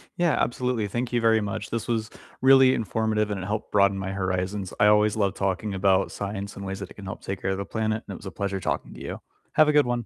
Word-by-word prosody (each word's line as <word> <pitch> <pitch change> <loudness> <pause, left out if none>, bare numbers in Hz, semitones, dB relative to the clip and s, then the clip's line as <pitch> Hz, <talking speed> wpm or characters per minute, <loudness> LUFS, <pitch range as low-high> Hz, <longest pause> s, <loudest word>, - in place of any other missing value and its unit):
Yeah, 175 -2 +2
absolutely, 120 -3 0
thank 120 +4 -3
you 120 - +2
very 115 -1 +4
much, 105 -2 -4
this 115 +1 -3
was 110 -2 -1 0.3
really 130 0 +7
informative, 110 -1 0
and 95 -2 -3
it - - -5
helped 105 +2 -3
broaden 100 -1 +4
my 95 0 -3
horizons, 95 0 -2
I 105 - +6
always 105 0 +4
love 100 -2 +1
talking 100 +1 -2
about 95 0 +2
science 100 0 -5
and 100 - -7
ways 95 +1 -4
that 100 - -6
it - - -12
can 100 - -11
help 95 - -6
take 95 0 -5
care 95 - 0
of 95 - -1
the 100 - -4
planet, 110 0 -2
and - - -6
it - - -7
was 105 - -14
a 95 - -5
pleasure 100 -1 -3
talking - - -3
to - - -11
you. - - -5 0.3
Have 155 - +5
a 150 - +3
good 150 -2 +5
one. 120 -2 -1
105 Hz, 270 wpm, -25 LUFS, 95-115 Hz, 0.3 s, really